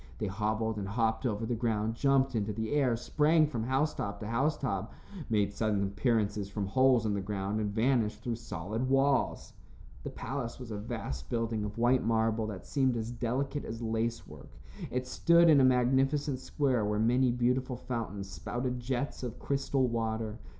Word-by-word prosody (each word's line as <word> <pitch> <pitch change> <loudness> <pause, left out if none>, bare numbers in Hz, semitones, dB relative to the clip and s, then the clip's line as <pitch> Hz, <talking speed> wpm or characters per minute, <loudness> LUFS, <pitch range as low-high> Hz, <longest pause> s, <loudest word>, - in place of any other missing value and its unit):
They - - -2
hobbled 110 +2 -1
and 100 -2 -3
hopped 110 +3 0
over 110 -1 -2
the 120 - -1
ground, 110 -2 0
jumped 135 +2 +2
into 105 -2 -1
the 110 +1 -3
air, 135 -5 +2
sprang 155 +6 +3
from 120 -7 -3
housetop 130 -6 -1
to 105 - -4
housetop, 125 -5 -1 0.4
made 100 -3 +1
sudden 105 -1 0
appearances 105 -1 0
from 100 0 -3
holes 125 +2 +3
in 105 - +1
the 100 - -1
ground 100 +1 -2
and 105 -1 -1
vanished 110 0 +1
through 120 -2 -2
solid 110 +3 -4
walls. 135 0 +1 0.5
The - - -5
palace 120 -4 -5
was 125 -3 -8
a 105 - -3
vast 105 - -5
building 115 -2 -1
of 105 +1 -5
white 120 +2 +3
marble 110 -1 +1
that 100 -4 -7
seemed 130 -4 +1
as 115 +1 -3
delicate 130 +4 -2
as 115 0 -6
lace 115 +1 -1
work. - - -12 0.4
It 125 0 -2
stood 170 +5 +5
in 140 -3 +6
a - - +5
magnificent 130 +2 +2
square 130 -4 0
where 105 0 0
many 125 +4 +3
beautiful 125 +1 0
fountains 110 -6 -4
spouted 120 +8 -3
jets 125 +3 -3
of 120 -3 -5
crystal 135 -1 0
water. 115 -1 -2
115 Hz, 175 wpm, -31 LUFS, 105-130 Hz, 0.5 s, in